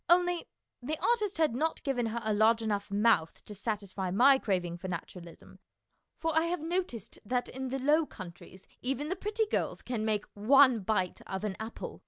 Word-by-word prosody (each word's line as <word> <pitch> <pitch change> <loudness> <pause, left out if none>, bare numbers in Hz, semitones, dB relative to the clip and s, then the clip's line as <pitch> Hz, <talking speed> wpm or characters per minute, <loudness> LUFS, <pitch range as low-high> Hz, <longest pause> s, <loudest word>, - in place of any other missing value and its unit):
Only 355 0 +3 0.3
the 300 +5 -3
artist 425 -4 +1
had 315 -6 +2
not 315 +7 -1
given 245 -4 0
her 230 +1 -3
a 215 0 0
large 225 +2 +4
enough 205 -2 -1
mouth 200 -5 +2
to 210 - -8
satisfy 200 -3 -3
my 265 +8 +6
craving 175 -6 -1
for 190 - -6
naturalism, 170 -1 -8 0.6
for 325 -1 -1
I 320 +1 +4
have 350 +1 -1
noticed 325 - -3
that 245 +3 -1
in 265 +1 -5
the 265 +1 -2
Low 300 +4 +3
Countries 185 0 -11 0.2
even 270 +4 -2
the 375 - -1
pretty 420 +3 -1
girls 420 - -2
can 235 -4 -3
make 215 -1 0
one 255 +3 +5
bite 185 -3 -1
of 190 +1 -4
an 205 -3 -2
apple. 220 +1 -6
230 Hz, 185 wpm, -30 LUFS, 200-305 Hz, 0.6 s, my